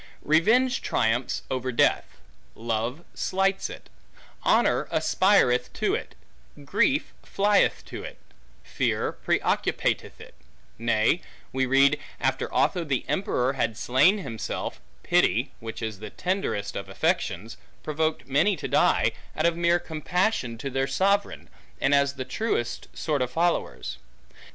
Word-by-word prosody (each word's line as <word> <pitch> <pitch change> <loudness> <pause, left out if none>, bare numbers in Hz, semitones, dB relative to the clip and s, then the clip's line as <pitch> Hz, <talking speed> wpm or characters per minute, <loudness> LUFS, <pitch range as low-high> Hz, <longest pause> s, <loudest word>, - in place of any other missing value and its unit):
Revenge 230 - +3
triumphs 115 +3 0
over 130 0 -1
death; 115 - +2 0.5
love 115 +7 -3
slights 195 +1 0
it; - - -10 0.5
honor - - +2
aspireth 185 -11 +3
to - - 0
it; - - -4 0.5
grief 210 - +1
flieth 200 0 +2
to - - -7
it; - - -8 0.5
fear - - -1
preoccupateth - - 0
it; - - -13 0.5
nay, 115 +7 +2 0.3
we 130 0 +1
read, 135 +2 +4 0.2
after - - -1
Otho 175 - +1
the 135 -5 -1
emperor 135 -9 0
had 115 -5 -1
slain 140 - +4
himself, 115 - -5 0.2
pity 140 -7 +2
(which 115 -1 -7
is 110 -3 -4
the 110 - -7
tenderest 180 - -2
of - - -5
affections) 110 +6 -1 0.3
provoked 155 +1 -1
many 155 +9 +3
to 150 - -5
die, - - +3 0.3
out - - +1
of 170 -1 +3
mere 170 0 +3
compassion 175 - -1
to 135 +4 -5
their 135 +1 0
sovereign, 200 +4 0 0.3
and 135 - +2
as 140 0 +3
the 130 -1 -5
truest 130 - -2
sort 150 -4 -1
of 125 - 0
followers. 170 +6 -1
140 Hz, 130 wpm, -26 LUFS, 125-180 Hz, 0.5 s, read